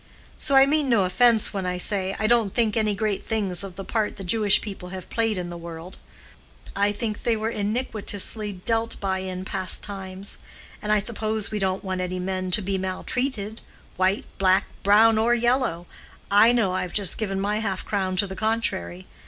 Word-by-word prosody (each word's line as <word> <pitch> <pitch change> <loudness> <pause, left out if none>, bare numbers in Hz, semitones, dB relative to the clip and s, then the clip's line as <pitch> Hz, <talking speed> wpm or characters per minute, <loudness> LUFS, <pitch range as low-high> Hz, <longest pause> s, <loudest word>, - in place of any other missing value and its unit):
So 280 - 0
I 270 0 +8
mean 290 -1 +1
no 230 -5 +4
offence 220 +5 +3
when 195 -2 -2
I 180 0 -1
say 190 0 0
I 215 - -1
don't 225 -3 +3
think 225 -3 +2
any 215 -2 +1
great 210 -1 -1
things 200 -5 -1
of 190 -2 -8
the 195 +1 -7
part 220 -2 -1
the 195 - -7
Jewish 205 +2 +4
people 195 -4 -7
have 185 -1 -8
played 225 -3 +1
in 175 -1 -4
the 175 - -6
world. 170 +1 -9 0.7
What - - -14
then? 200 - -1
I 205 - +2
think 210 0 -3
they 230 -2 +1
were 220 +1 -2
iniquitously 210 -3 -1
dealt 230 0 0
by 190 -1 -1
in 185 0 -5
past 190 -2 +1
times. 195 -1 -5 0.4
And 210 - -2
I 215 - +5
suppose 215 0 -1
we 215 - -2
don't 190 0 -1
want 185 -1 -2
any 185 0 -3
men 185 0 -2
to 195 +3 +2
be 195 0 -1
maltreated, 215 +3 -2 0.3
white, 185 +2 +1
black, 190 0 +4 0.2
brown, 220 +2 +5
or 235 +2 +3
yellow—I 230 -2 +1
know 225 -6 +2
I've 185 -1 -3
just 200 -4 0
given 195 -3 -2
my 205 +2 0
half 195 -4 -3
crown 190 -3 -1
to 200 +2 +2
the 190 -1 -7
contrary. 185 - -2
200 Hz, 195 wpm, -24 LUFS, 185-220 Hz, 0.7 s, I